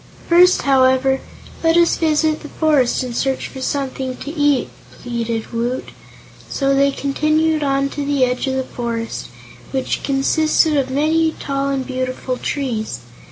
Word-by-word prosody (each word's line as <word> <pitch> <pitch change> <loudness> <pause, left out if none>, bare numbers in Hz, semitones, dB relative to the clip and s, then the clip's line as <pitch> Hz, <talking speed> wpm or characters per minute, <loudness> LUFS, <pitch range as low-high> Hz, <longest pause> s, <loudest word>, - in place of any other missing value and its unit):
"First, 355 +2 +5
however, 265 0 +3 0.4
let 325 +1 +4
us 340 0 +4
visit 310 -1 +1
the 300 - -10
forest 290 -6 +2
and 245 -2 -5
search 270 +2 -1
for 265 - -9
something 265 -1 -3
to 290 +3 -7
eat," 290 -4 +1 0.3
pleaded 235 -2 -4
Woot. 240 +2 -2 0.6
So 275 -1 +1
they 275 +1 +4
continued 305 +3 +1
on 275 -1 +1
to 290 - -4
the 280 -2 +2
edge 250 +2 -2
of 265 - -1
the 265 - 0
forest, 230 -2 -4 0.4
which 265 -1 -2
consisted 305 +3 +2
of 270 -2 +1
many 315 +4 +1
tall 275 0 -2
and 270 -1 -1
beautiful 255 -1 -3
trees. 225 - -3
275 Hz, 150 wpm, -19 LUFS, 255-300 Hz, 0.6 s, First